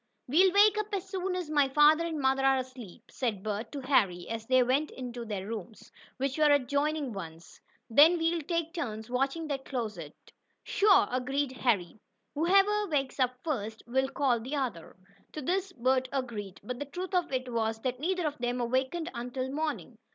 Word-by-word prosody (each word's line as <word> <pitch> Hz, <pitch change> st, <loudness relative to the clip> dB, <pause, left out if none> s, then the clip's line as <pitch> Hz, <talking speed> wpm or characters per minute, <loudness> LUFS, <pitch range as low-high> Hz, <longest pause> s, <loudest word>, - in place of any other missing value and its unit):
"We'll 360 Hz, +8 st, +5 dB
wake 420 Hz, +2 st, +5 dB
up 425 Hz, -, -2 dB
as 390 Hz, -1 st, -2 dB
soon 375 Hz, -1 st, -2 dB
as 355 Hz, -4 st, -4 dB
my 290 Hz, -3 st, +3 dB
father 300 Hz, +4 st, +5 dB
and 320 Hz, -2 st, -3 dB
mother 270 Hz, 0 st, +2 dB
are 270 Hz, 0 st, +4 dB
asleep," 255 Hz, -7 st, -8 dB
said 220 Hz, -7 st, -2 dB
Bert 215 Hz, +1 st, -3 dB
to 285 Hz, -, -5 dB
Harry, 195 Hz, -10 st, +1 dB
as 225 Hz, 0 st, -5 dB
they 255 Hz, -1 st, +5 dB
went 270 Hz, +5 st, +1 dB, 0.2 s
to 240 Hz, -1 st, -6 dB
their 205 Hz, -3 st, -4 dB
rooms, 220 Hz, 0 st, -8 dB, 0.3 s
which 270 Hz, +2 st, -2 dB
were 305 Hz, -1 st, +5 dB
adjoining 285 Hz, 0 st, +1 dB
ones. 165 Hz, -4 st, -9 dB, 0.3 s
"Then 305 Hz, +9 st, +6 dB
we'll 330 Hz, 0 st, 0 dB
take 335 Hz, +1 st, -2 dB
turns 220 Hz, -9 st, -5 dB
watching 275 Hz, +6 st, -1 dB
that 270 Hz, -2 st, -3 dB
closet." 215 Hz, -, -5 dB, 0.5 s
"Sure," 400 Hz, -1 st, +4 dB
agreed 265 Hz, +2 st, -1 dB
Harry. 220 Hz, -7 st, 0 dB, 0.3 s
"Whoever 395 Hz, +6 st, +3 dB
wakes 275 Hz, -5 st, -1 dB
up 255 Hz, -1 st, +1 dB
first, 225 Hz, -8 st, -3 dB
will 265 Hz, +2 st, 0 dB
call 270 Hz, -4 st, +1 dB
the 255 Hz, +6 st, -5 dB
other." 235 Hz, -, -4 dB, 0.4 s
To 305 Hz, -, -5 dB
this 375 Hz, +5 st, -1 dB
Bert 260 Hz, -1 st, +1 dB
agreed, 220 Hz, -8 st, -4 dB
but 250 Hz, +4 st, -5 dB
the 290 Hz, -, -3 dB
truth 360 Hz, +7 st, -6 dB
of 355 Hz, -4 st, +1 dB
it 255 Hz, -2 st, -3 dB
was 225 Hz, -1 st, -1 dB
that 250 Hz, 0 st, -2 dB
neither 360 Hz, +3 st, -1 dB
of 295 Hz, -2 st, -3 dB
them 245 Hz, +1 st, -1 dB
awakened 260 Hz, +8 st, -1 dB
until 250 Hz, +2 st, -4 dB
morning. 305 Hz, +2 st, -4 dB
265 Hz, 180 wpm, -29 LUFS, 235-315 Hz, 0.5 s, Then